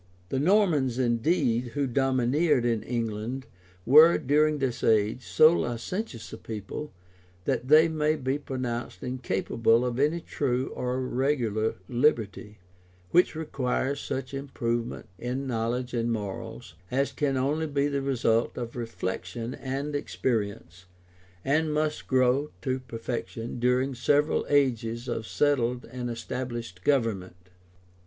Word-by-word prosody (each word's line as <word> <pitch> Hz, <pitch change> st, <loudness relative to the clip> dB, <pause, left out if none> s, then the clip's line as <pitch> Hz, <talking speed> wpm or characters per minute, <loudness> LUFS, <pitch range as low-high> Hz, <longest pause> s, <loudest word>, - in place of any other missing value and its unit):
] 90 Hz, 0 st, -31 dB
The 135 Hz, -, 0 dB
Normans, 155 Hz, -, +3 dB
indeed, 120 Hz, -1 st, +1 dB
who 145 Hz, -1 st, +1 dB
domineered 130 Hz, +2 st, +2 dB
in 115 Hz, -3 st, +1 dB
England, 115 Hz, +2 st, -3 dB, 0.4 s
were, 155 Hz, +7 st, +8 dB
during 150 Hz, +2 st, +2 dB
this 135 Hz, -4 st, -2 dB
age, 110 Hz, +3 st, +2 dB
so 155 Hz, +1 st, +6 dB
licentious 120 Hz, -, -3 dB
a -, -, -7 dB
people, 110 Hz, +7 st, -6 dB, 0.5 s
that 125 Hz, -, -1 dB
they 155 Hz, +3 st, +7 dB
may 155 Hz, -1 st, +1 dB
be 135 Hz, -1 st, -1 dB
pronounced 125 Hz, -4 st, -4 dB
incapable 120 Hz, -1 st, +1 dB
of 125 Hz, 0 st, -2 dB
any 150 Hz, +4 st, +2 dB
true 130 Hz, -5 st, -1 dB
or 125 Hz, +1 st, -2 dB
regular 125 Hz, -4 st, 0 dB
liberty; 115 Hz, -5 st, 0 dB, 0.5 s
which 180 Hz, -1 st, +4 dB
requires 140 Hz, -3 st, -1 dB
such 130 Hz, 0 st, -4 dB
improvement 120 Hz, -4 st, -3 dB
in 125 Hz, +3 st, -3 dB
knowledge 125 Hz, +1 st, -2 dB
and 120 Hz, -1 st, 0 dB
morals, 115 Hz, 0 st, -5 dB, 0.2 s
as 135 Hz, +2 st, 0 dB
can 140 Hz, -3 st, 0 dB
only 150 Hz, +5 st, 0 dB
be 140 Hz, -1 st, +1 dB
the 140 Hz, -1 st, -1 dB
result 120 Hz, -4 st, +1 dB
of 120 Hz, -2 st, -5 dB
reflection 115 Hz, 0 st, -4 dB
and 140 Hz, +3 st, -4 dB
experience, 100 Hz, -, -2 dB, 0.6 s
and 155 Hz, +3 st, +2 dB
must 150 Hz, 0 st, -1 dB
grow 130 Hz, +3 st, +3 dB
to 130 Hz, -1 st, 0 dB
perfection 120 Hz, -1 st, -5 dB
during 125 Hz, +2 st, +2 dB
several 145 Hz, +4 st, +2 dB
ages 120 Hz, -4 st, +1 dB
of 115 Hz, -2 st, -3 dB
settled 125 Hz, -4 st, +1 dB
and 125 Hz, -1 st, -4 dB
established 120 Hz, -5 st, -5 dB
government. 115 Hz, -10 st, +1 dB
125 Hz, 125 wpm, -27 LUFS, 115-140 Hz, 0.6 s, were